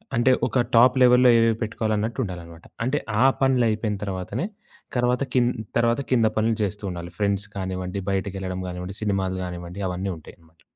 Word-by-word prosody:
అంటే 120 Hz, +2 st, +4 dB, 0.2 s
ఒక 125 Hz, -, +1 dB
టాప్ 125 Hz, +3 st, +6 dB
లెవెల్‌లో 125 Hz, 0 st, +6 dB
ఏవేవి 115 Hz, -1 st, +3 dB
పెట్టుకోవాలన్నట్టు 110 Hz, +1 st, -2 dB
ఉండాలన్నమాట. 85 Hz, -3 st, -9 dB, 0.2 s
అంటే 145 Hz, +3 st, +1 dB, 0.2 s
ఆ -, -, +6 dB, 0.2 s
పనులు 130 Hz, -3 st, +3 dB
అయిపోయిన 110 Hz, -1 st, -1 dB
తరువాతనే 100 Hz, -, -3 dB, 0.5 s
తర్వాత 125 Hz, +2 st, +2 dB
కింద్ 125 Hz, -1 st, +3 dB, 0.3 s
తర్వాత 120 Hz, +3 st, +2 dB
కింద 115 Hz, -3 st, +4 dB
పనులు 110 Hz, +1 st, +2 dB
జేస్తూ 105 Hz, +1 st, -4 dB
ఉండాలి. 85 Hz, -1 st, -7 dB
ఫ్రెండ్స్ 100 Hz, 0 st, 0 dB
కానివ్వండి, 95 Hz, +1 st, -3 dB
బయటికెళ్ళడం 95 Hz, -1 st, -3 dB
గానివ్వండి, 90 Hz, +2 st, -6 dB
సినిమాలు 95 Hz, -2 st, 0 dB
గానివ్వండి 90 Hz, +2 st, -7 dB
అవన్నీ 95 Hz, +2 st, -3 dB
ఉంటాయి 80 Hz, -, -13 dB
అనమాట. 80 Hz, 0 st, -26 dB
105 Hz, 155 wpm, -24 LUFS, 95-120 Hz, 0.5 s, టాప్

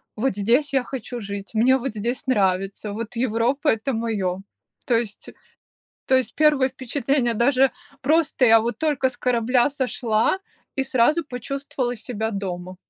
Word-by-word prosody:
"Вот 225 Hz, -2 st, 0 dB
здесь 245 Hz, +8 st, +2 dB
я 265 Hz, -2 st, +2 dB
хочу 245 Hz, -1 st, -6 dB
жить". 200 Hz, -1 st, -6 dB
"Мне 250 Hz, +4 st, +4 dB
вот 265 Hz, +2 st, -3 dB
здесь 235 Hz, +6 st, -3 dB
нравится". 195 Hz, -2 st, 0 dB
"Вот 230 Hz, +2 st, -6 dB
Европа- 250 Hz, +5 st, 0 dB
это 225 Hz, +4 st, 0 dB
моё". 200 Hz, -5 st, -2 dB, 0.4 s
То 240 Hz, -, +2 dB
есть 220 Hz, -3 st, -5 dB, 0.8 s
то 260 Hz, -, +3 dB
есть 250 Hz, -3 st, -2 dB
1 295 Hz, -4 st, +4 dB
впечатление: 260 Hz, -1 st, -1 dB
даже 260 Hz, +3 st, +3 dB, 0.3 s
просто 290 Hz, -2 st, +2 dB
я 225 Hz, 0 st, +7 dB
вот 235 Hz, +2 st, -3 dB
только 290 Hz, -4 st, +1 dB
с 245 Hz, -, -9 dB
корабля 245 Hz, +1 st, +2 dB
сошла 250 Hz, -, 0 dB, 0.4 s
и 270 Hz, -, +1 dB
сразу 265 Hz, +6 st, +2 dB
почувствовала 255 Hz, -1 st, -4 dB
себя 220 Hz, 0 st, -4 dB
дома. 185 Hz, -2 st, -5 dB
245 Hz, 150 wpm, -23 LUFS, 220-265 Hz, 0.8 s, я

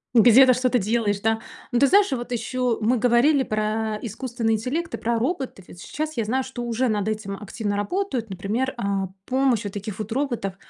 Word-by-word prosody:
Где-то 245 Hz, +3 st, +7 dB
что-то 255 Hz, 0 st, +2 dB
делаешь, 210 Hz, -1 st, 0 dB
да? 225 Hz, +1 st, +1 dB, 0.3 s
Ну, 245 Hz, -, +1 dB
ты 280 Hz, -, +6 dB
знаешь, 400 Hz, +5 st, +4 dB
вот 240 Hz, -1 st, -4 dB
еще 245 Hz, +1 st, -1 dB
мы 235 Hz, +4 st, +2 dB
говорили 250 Hz, +5 st, +4 dB
про 215 Hz, -1 st, -1 dB
искусственный 235 Hz, 0 st, -2 dB
интеллект 265 Hz, +10 st, -2 dB
и -, -, -6 dB
про 235 Hz, 0 st, -1 dB
роботов. 260 Hz, -, -3 dB
И -, -, -13 dB
щас 310 Hz, -, -5 dB
я 225 Hz, -, 0 dB
знаю, 260 Hz, +5 st, 0 dB
что 260 Hz, -2 st, -6 dB
уже 240 Hz, +2 st, 0 dB
над 210 Hz, -2 st, 0 dB
этим 215 Hz, -2 st, -3 dB
активно 210 Hz, 0 st, -3 dB
работают. 250 Hz, -, -2 dB
Например, 215 Hz, +8 st, -2 dB
а, 200 Hz, -4 st, -1 dB, 0.2 s
помощь 260 Hz, -4 st, +1 dB
вот 200 Hz, -, -5 dB
таких 205 Hz, 0 st, -6 dB
вот 215 Hz, +1 st, -5 dB
роботов, 240 Hz, -7 st, -2 dB
235 Hz, 190 wpm, -24 LUFS, 215-260 Hz, 0.3 s, Где-то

